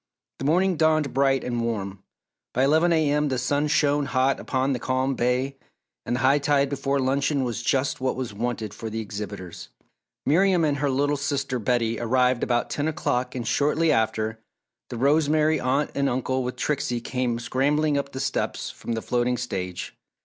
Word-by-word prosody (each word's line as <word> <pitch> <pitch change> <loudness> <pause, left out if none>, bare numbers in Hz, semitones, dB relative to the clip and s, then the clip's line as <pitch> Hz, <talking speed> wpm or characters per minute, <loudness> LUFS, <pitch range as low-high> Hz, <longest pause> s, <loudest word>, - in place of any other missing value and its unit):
The - - -4
morning 180 +4 +2
dawned 155 -3 +2
bright 135 0 +2
and 120 -1 -2
warm. 100 -4 -3 0.5
By 130 - +3
eleven 160 +5 +4
A. 155 -3 +2
M. 150 0 +2
the 130 - -1
sun 145 +4 0
shone 145 -1 +2
hot 130 0 +1
upon 135 +1 0
the 125 - -2
calm 130 +2 0
bay, 125 +2 0 0.5
and 120 - 0
the 125 - -2
high 135 +2 +4
tide 140 -1 +2
before 140 0 -1
luncheon 135 +1 +1
was 120 -2 -3
just 130 +3 0
what 130 - 0
was 125 -5 -4
wanted 110 -1 -3
for 110 - -6
the 110 +1 -4
exhibitors. 100 -4 -7 0.6
Miriam 180 +2 +3
and 145 -2 +1
her 145 0 0
little 145 +2 +1
sister 140 -2 -2
Betty 115 0 0
arrived 125 +1 +2
about 120 -1 0
ten 145 +1 -1
o'clock 130 -6 -1
and 120 -2 -4
shortly 155 +3 +2
after, 110 -2 0 0.5
the 120 - -5
Rosemary 155 +3 +3
Aunt 135 +4 0
and 140 0 +1
Uncle 130 +1 -1
with 125 0 -4
Trixie 140 -4 -1
came 125 0 -2
scrambling 145 +5 +1
up 140 0 -2
the 130 - -6
steps 135 - -2
from 115 - -5
the 115 - -3
floating 125 0 0
stage. 95 -7 -4
130 Hz, 180 wpm, -25 LUFS, 120-145 Hz, 0.6 s, eleven